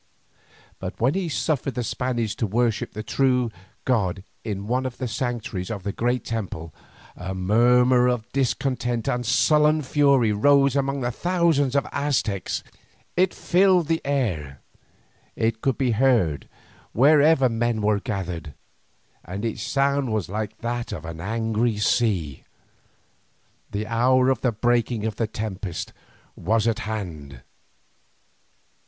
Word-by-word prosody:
But 95 Hz, 0 st, -6 dB
when 125 Hz, +5 st, +2 dB
he 185 Hz, -3 st, -2 dB
suffered 140 Hz, -4 st, -1 dB
the 125 Hz, -, -1 dB
Spaniards 120 Hz, -2 st, -2 dB
to 110 Hz, -, 0 dB
worship 115 Hz, +1 st, 0 dB
the 110 Hz, -, -5 dB
true 125 Hz, -2 st, +1 dB, 0.3 s
God 95 Hz, -7 st, 0 dB, 0.2 s
in 100 Hz, -3 st, -4 dB
one 130 Hz, +4 st, 0 dB
of 125 Hz, -, -8 dB
the 130 Hz, -, -3 dB
sanctuaries 110 Hz, -5 st, -3 dB
of 105 Hz, -4 st, -5 dB
the 100 Hz, -, -2 dB
great 120 Hz, +4 st, -1 dB
temple, 95 Hz, -8 st, -5 dB, 0.4 s
a 95 Hz, +1 st, -5 dB
murmur 125 Hz, +6 st, +4 dB
of 125 Hz, -3 st, -1 dB
discontent 125 Hz, -3 st, -1 dB
and 125 Hz, 0 st, 0 dB
sullen 150 Hz, +5 st, +3 dB
fury 135 Hz, -4 st, +3 dB
rose 140 Hz, +5 st, +4 dB
among 140 Hz, 0 st, 0 dB
the 120 Hz, 0 st, -1 dB
thousands 165 Hz, -3 st, +1 dB
of 140 Hz, -, +3 dB
the -, -, -11 dB
Aztecs. 120 Hz, -, -1 dB, 0.5 s
It 185 Hz, +1 st, +3 dB
filled 180 Hz, -2 st, +3 dB
the 165 Hz, 0 st, +1 dB
air, 90 Hz, -, -2 dB, 0.7 s
it 110 Hz, 0 st, -1 dB
could 135 Hz, -, 0 dB
be 130 Hz, -3 st, +1 dB
heard 110 Hz, -, +2 dB, 0.4 s
wherever 145 Hz, +2 st, +5 dB
men 115 Hz, -1 st, 0 dB
were 105 Hz, -1 st, +2 dB
gathered, 90 Hz, -, -5 dB, 0.7 s
and 95 Hz, +5 st, -5 dB
its 115 Hz, -, -3 dB
sound 140 Hz, -2 st, +1 dB
was 105 Hz, -5 st, -1 dB
like 105 Hz, +1 st, -4 dB
that 120 Hz, 0 st, -3 dB
of 80 Hz, -2 st, -6 dB
a -, -, -5 dB
distant 80 Hz, -, -9 dB
angry 115 Hz, 0 st, 0 dB
sea. 100 Hz, -, 0 dB, 1.3 s
The 105 Hz, +1 st, -3 dB
hour 125 Hz, +3 st, +3 dB
of 130 Hz, -, -1 dB
the 125 Hz, -, +2 dB
breaking 120 Hz, 0 st, 0 dB
of 110 Hz, -2 st, -3 dB
the 115 Hz, -, 0 dB
tempest 105 Hz, -5 st, -5 dB, 0.4 s
was 110 Hz, +5 st, +1 dB
at 115 Hz, -, +1 dB
hand. 75 Hz, -, -6 dB
120 Hz, 140 wpm, -24 LUFS, 105-135 Hz, 1.3 s, wherever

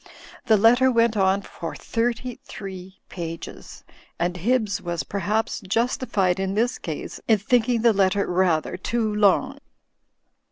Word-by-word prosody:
The 220 Hz, -3 st, +5 dB
letter 240 Hz, +5 st, +5 dB
went 230 Hz, -2 st, +2 dB
on 195 Hz, 0 st, +2 dB
for 165 Hz, -4 st, -7 dB
thirty 240 Hz, +1 st, -2 dB
three 190 Hz, -1 st, -9 dB
pages 165 Hz, -2 st, -8 dB, 0.3 s
and 175 Hz, +1 st, -1 dB
Hibbs 215 Hz, +2 st, 0 dB
was 175 Hz, -1 st, -3 dB
perhaps 210 Hz, +4 st, -1 dB
justified 200 Hz, -3 st, 0 dB
in 195 Hz, 0 st, -2 dB
this 235 Hz, +3 st, 0 dB
case 160 Hz, -3 st, -6 dB
in 220 Hz, -, +5 dB
thinking 230 Hz, +2 st, +1 dB
the 230 Hz, -2 st, +5 dB
letter 200 Hz, 0 st, +2 dB
rather 175 Hz, -3 st, +1 dB
too 220 Hz, +3 st, -1 dB
long. 210 Hz, +7 st, +2 dB
205 Hz, 130 wpm, -24 LUFS, 185-230 Hz, 0.3 s, The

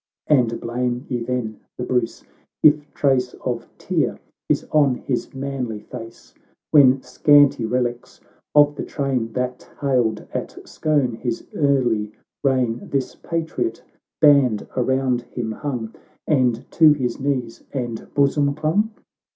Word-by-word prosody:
And 125 Hz, -6 st, +2 dB
blame 125 Hz, +2 st, -2 dB
ye 125 Hz, -, -1 dB
then, 115 Hz, -3 st, -3 dB, 0.2 s
the 125 Hz, -, -3 dB
Bruce, 125 Hz, -2 st, -1 dB, 0.4 s
if 150 Hz, -1 st, +5 dB
trace 130 Hz, -3 st, +1 dB
Of -, -, -2 dB
tear -, -, -1 dB, 0.3 s
is -, -, +1 dB
on 145 Hz, -4 st, +4 dB
his 125 Hz, 0 st, -3 dB
manly 130 Hz, -5 st, -3 dB
face, 115 Hz, -1 st, -11 dB, 0.4 s
When, 135 Hz, -3 st, +6 dB
scanty 145 Hz, -1 st, +4 dB
relics 120 Hz, 0 st, -2 dB, 0.4 s
of 145 Hz, 0 st, +6 dB
the 145 Hz, -, -5 dB
train 130 Hz, -6 st, -2 dB
That 125 Hz, 0 st, -3 dB
hailed 125 Hz, -5 st, +1 dB
at -, -, -4 dB
Scone 145 Hz, -6 st, 0 dB
his 120 Hz, -1 st, -3 dB
early 120 Hz, -7 st, +1 dB, 0.3 s
reign, 130 Hz, -4 st, +1 dB
This 135 Hz, -2 st, -1 dB
patriot 165 Hz, -, -3 dB, 0.4 s
band 140 Hz, -8 st, +4 dB
around 130 Hz, -1 st, +1 dB
him 120 Hz, -2 st, -5 dB
hung, 115 Hz, -2 st, -4 dB, 0.3 s
And 125 Hz, -5 st, +1 dB
to 155 Hz, -2 st, +6 dB
his 125 Hz, -5 st, -2 dB
knees 130 Hz, -4 st, -2 dB
and 120 Hz, -4 st, -5 dB
bosom 140 Hz, 0 st, +2 dB
clung 160 Hz, +8 st, +1 dB
130 Hz, 125 wpm, -22 LUFS, 120-145 Hz, 0.4 s, When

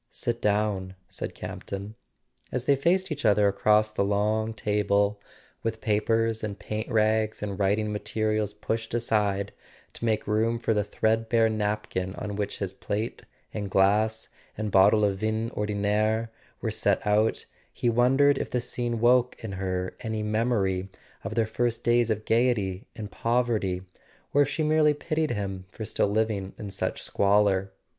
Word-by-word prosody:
"Sit 120 Hz, 0 st, -3 dB
down," 100 Hz, -3 st, 0 dB
said -, -, -6 dB
Campton. 100 Hz, +2 st, -6 dB, 0.6 s
As 125 Hz, -1 st, -2 dB
they 140 Hz, +2 st, +4 dB
faced 175 Hz, +6 st, +1 dB
each 145 Hz, -1 st, -3 dB
other 105 Hz, -2 st, +4 dB
across 105 Hz, +2 st, +3 dB
the 105 Hz, -, 0 dB
long 105 Hz, +2 st, +1 dB
table, 105 Hz, -1 st, +1 dB, 0.4 s
with 115 Hz, 0 st, -2 dB
papers 115 Hz, +1 st, +1 dB
and 105 Hz, -2 st, -3 dB
paint 110 Hz, +1 st, -4 dB
rags 110 Hz, -1 st, +1 dB
and 100 Hz, -1 st, -4 dB
writing 105 Hz, +2 st, +1 dB
materials 110 Hz, 0 st, -1 dB
pushed 110 Hz, +2 st, -3 dB
aside 105 Hz, -4 st, 0 dB, 0.4 s
to -, -, -10 dB
make 110 Hz, -2 st, +1 dB
room 110 Hz, +2 st, +1 dB
for 115 Hz, -1 st, 0 dB
the 105 Hz, -1 st, +1 dB
threadbare 110 Hz, +2 st, +1 dB
napkin 105 Hz, -3 st, -2 dB
on 105 Hz, -1 st, -5 dB
which 100 Hz, 0 st, -3 dB
his 95 Hz, -2 st, -3 dB
plate 105 Hz, +3 st, -4 dB, 0.3 s
and 105 Hz, -2 st, -4 dB
glass, 105 Hz, +4 st, +2 dB, 0.3 s
and 110 Hz, -1 st, -2 dB
bottle 105 Hz, +3 st, +5 dB
of 100 Hz, -1 st, 0 dB
vin 110 Hz, +2 st, -1 dB
ordinaire, 105 Hz, +2 st, 0 dB, 0.3 s
were -, -, -1 dB
set -, -, +1 dB
out, 105 Hz, +2 st, +2 dB, 0.3 s
he -, -, -2 dB
wondered 135 Hz, +4 st, +4 dB
if -, -, -3 dB
the 125 Hz, -, 0 dB
scene 120 Hz, -1 st, -3 dB
woke 125 Hz, +1 st, +4 dB
in 110 Hz, -, -4 dB
her 95 Hz, -1 st, -3 dB
any 110 Hz, -3 st, -3 dB
memory 105 Hz, -4 st, 0 dB, 0.3 s
of 100 Hz, +3 st, -5 dB
their 115 Hz, -1 st, +2 dB
first 115 Hz, +1 st, -1 dB
days 120 Hz, 0 st, +3 dB
of 110 Hz, -1 st, -1 dB
gaiety 110 Hz, -5 st, +1 dB
and 105 Hz, -3 st, -7 dB
poverty, 115 Hz, -6 st, 0 dB, 0.5 s
or 145 Hz, -, +5 dB
if 145 Hz, -, +3 dB
she 155 Hz, -, -1 dB
merely 155 Hz, -1 st, +4 dB
pitied 155 Hz, +1 st, -1 dB
him 95 Hz, -2 st, -3 dB
for 110 Hz, -, -7 dB
still 105 Hz, -, 0 dB
living 105 Hz, -2 st, -1 dB
in 105 Hz, -2 st, -6 dB
such -, -, -3 dB
squalor. 100 Hz, -1 st, +2 dB
110 Hz, 160 wpm, -27 LUFS, 100-115 Hz, 0.6 s, bottle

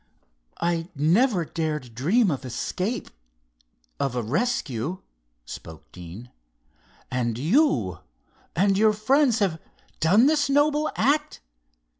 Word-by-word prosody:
"I 170 Hz, -1 st, -1 dB
never 175 Hz, -, +2 dB
dared 150 Hz, -7 st, -3 dB
dream 180 Hz, -, +2 dB
of 140 Hz, -, -4 dB
escape, 180 Hz, -, -3 dB, 0.9 s
of 135 Hz, -3 st, -1 dB
a 120 Hz, -, -1 dB
rescue," 155 Hz, -, -2 dB, 0.4 s
spoke 80 Hz, +4 st, -10 dB
Deane. 90 Hz, +7 st, -10 dB, 0.8 s
"And 120 Hz, -3 st, -1 dB
you 265 Hz, -, +2 dB, 0.6 s
and 195 Hz, +2 st, +2 dB
your 215 Hz, 0 st, +5 dB
friends 255 Hz, +3 st, +2 dB
have 190 Hz, -7 st, 0 dB, 0.4 s
done 195 Hz, +10 st, +5 dB
this 290 Hz, -1 st, +2 dB
noble 295 Hz, +2 st, +2 dB
act! 290 Hz, +6 st, +1 dB
180 Hz, 105 wpm, -25 LUFS, -, 0.9 s, your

